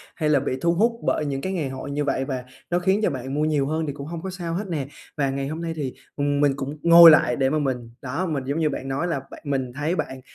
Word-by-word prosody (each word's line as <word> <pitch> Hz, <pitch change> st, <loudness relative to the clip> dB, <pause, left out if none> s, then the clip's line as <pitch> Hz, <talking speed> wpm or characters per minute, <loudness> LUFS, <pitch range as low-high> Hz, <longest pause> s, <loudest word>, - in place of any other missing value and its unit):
hay 155 Hz, -2 st, 0 dB
là 145 Hz, -2 st, +4 dB
bị 130 Hz, -1 st, -2 dB
thu 170 Hz, 0 st, +3 dB
hút 225 Hz, +7 st, +3 dB
bởi 155 Hz, -, 0 dB
những 135 Hz, -1 st, -2 dB
cái 190 Hz, +6 st, -3 dB
ngày 155 Hz, -7 st, -2 dB
hội 130 Hz, +1 st, -6 dB
như 145 Hz, +1 st, -1 dB
vậy 135 Hz, -1 st, 0 dB
và 130 Hz, -2 st, -4 dB, 0.3 s
nó 175 Hz, 0 st, +1 dB
khiến 190 Hz, +3 st, +2 dB
cho -, -, +3 dB
bạn 130 Hz, 0 st, -5 dB
mua 150 Hz, +2 st, +1 dB
nhiều 145 Hz, -3 st, +1 dB
hơn 160 Hz, +1 st, -1 dB
thì 140 Hz, -, -3 dB
cũng 140 Hz, 0 st, -8 dB
hông 165 Hz, 0 st, -5 dB
có 190 Hz, -, -5 dB
sao 175 Hz, -3 st, -5 dB
hết 195 Hz, +3 st, -3 dB
nè. 145 Hz, -6 st, -3 dB, 0.3 s
Và 140 Hz, -2 st, +1 dB
ngày 135 Hz, 0 st, -2 dB
hôm 155 Hz, +3 st, -5 dB
nay 165 Hz, -1 st, -3 dB
thì, 140 Hz, -5 st, -3 dB, 0.2 s
ừm, 145 Hz, 0 st, 0 dB
mình 145 Hz, -1 st, +4 dB
cũng 140 Hz, +2 st, -5 dB
ngồi 170 Hz, 0 st, +10 dB
lại 125 Hz, -5 st, +4 dB
để 135 Hz, -1 st, +2 dB
mà 155 Hz, +1 st, +1 dB
mình 125 Hz, -4 st, -2 dB
đó, 140 Hz, +8 st, -2 dB
mình 150 Hz, -6 st, -2 dB
giống 145 Hz, +4 st, -1 dB
như 155 Hz, -, +2 dB
bạn 135 Hz, -1 st, -5 dB
nói 140 Hz, +6 st, -1 dB
là 155 Hz, -5 st, -1 dB
bạn -, -, -11 dB
mình 135 Hz, -3 st, -1 dB
thấy 150 Hz, +5 st, -1 dB
bạn, 130 Hz, -5 st, -4 dB
145 Hz, 295 wpm, -24 LUFS, 135-165 Hz, 0.3 s, ngồi